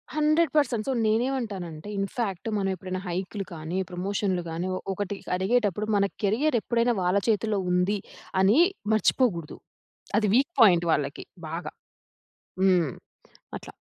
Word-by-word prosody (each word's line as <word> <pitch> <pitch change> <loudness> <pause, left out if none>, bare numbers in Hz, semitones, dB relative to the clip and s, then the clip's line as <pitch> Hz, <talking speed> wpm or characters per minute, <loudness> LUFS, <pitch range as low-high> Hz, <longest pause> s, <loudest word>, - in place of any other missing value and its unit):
100% 300 -6 +2
so, 270 - +1
నేనేమంటానంటే, 215 -8 -2
in fact 195 -1 -3
మనం 195 -1 0
ఎప్పుడైనా 185 0 -5
హైక్‌లు 190 +3 -3
కానీ, 160 +2 -4
ప్రమోషన్‌లు 185 0 -1
గాని, 165 +3 -3
ఒ - - -4
ఒకటి 205 +1 -3 0.2
అడిగేటప్పుడు, 210 +1 +1
మన 200 -1 +3 0.2
కెరియర్ 235 +7 +2
ఎప్పుడైనా 235 +1 +1
వాళ్ళ 180 +2 +2
చేతిలో 215 -1 +1
ఉంది, 180 +3 +2 0.4
అని 200 +6 +5 0.4
మర్చిపోకూడదు. 210 - +1 0.6
అది 215 -1 +2
వీక్ 275 +6 +3
పాయింట్ 175 -6 +6
వాళ్ళకి. 140 -2 -1 0.3
బాగా. 165 +3 -5 0.9
హ్మ్. 180 -7 +3 0.7
అట్లా. - - -12
200 Hz, 120 wpm, -26 LUFS, 180-230 Hz, 0.9 s, పాయింట్